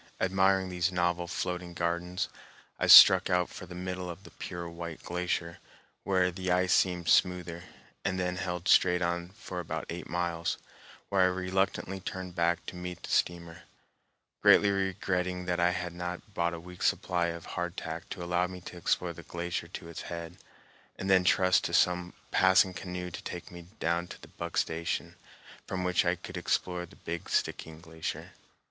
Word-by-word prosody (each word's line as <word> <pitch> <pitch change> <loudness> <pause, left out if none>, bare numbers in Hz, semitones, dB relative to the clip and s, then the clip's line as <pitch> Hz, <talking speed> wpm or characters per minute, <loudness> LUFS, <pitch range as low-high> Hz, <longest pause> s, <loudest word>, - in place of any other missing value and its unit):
Admiring 95 0 +2
these 90 0 0
novel 85 -1 0
floating 90 0 -3
gardens, 85 +2 -1 0.5
I - - +1
struck 95 0 +10
out 90 -1 +2
for 90 - -9
the 90 - -9
middle 90 0 -4
of 85 +3 -8
the - - -13
pure 85 -2 -6
white 85 -1 -7
glacier, 85 -1 -2 0.4
where 90 -2 +2
the 95 0 -3
ice 90 0 +3
seemed 90 -2 +2
smoother, 90 -1 +2 0.4
and 95 -1 -1
then 90 0 -1
held 90 -1 -3
straight 90 -1 +5
on 85 0 -1
for 95 -2 -7
about 80 -2 -4
eight 85 +1 -6
miles, 85 -1 -1 0.5
where 100 -2 +3
I - - +7
reluctantly 95 +1 0
turned 95 -1 -6
back 85 0 +1
to - - -7
meet 90 -1 -6
the - - -6
steamer, 85 -1 0 0.8
greatly 100 -1 +6
regretting 90 -2 -1
that 90 -1 -1
I 85 0 +4
had 90 -1 -3
not 90 +4 -6
brought 85 -2 0
a - - -7
week's 90 +1 -2
supply 85 -1 +1
of 85 -1 -5
hardtack 85 -1 -5
to 90 - -5
allow 90 +1 +1
me 90 0 -8
to 90 - -9
explore 85 0 0
the 85 - -10
glacier 85 +1 -4
to 85 - -8
its 85 -1 -7
head, 85 0 -7 0.6
and 95 +1 -2
then 95 -1 +6
trust 90 -2 +4
to - - 0
some 90 0 +2 0.2
passing 95 0 +5
canoe 90 0 -5
to - - -7
take 90 - -7
me 85 -1 -11
down 85 +1 0
to - - -11
Buck 85 -1 -6
Station, 80 +1 -1 0.5
from 90 -1 -2
which 90 -1 +2
I - - +2
could - - -8
explore 90 -1 -1
the 95 - -17
Big 85 0 -6
Stickeen 80 0 -2
Glacier. 80 -2 -6
90 Hz, 175 wpm, -30 LUFS, 85-90 Hz, 0.8 s, struck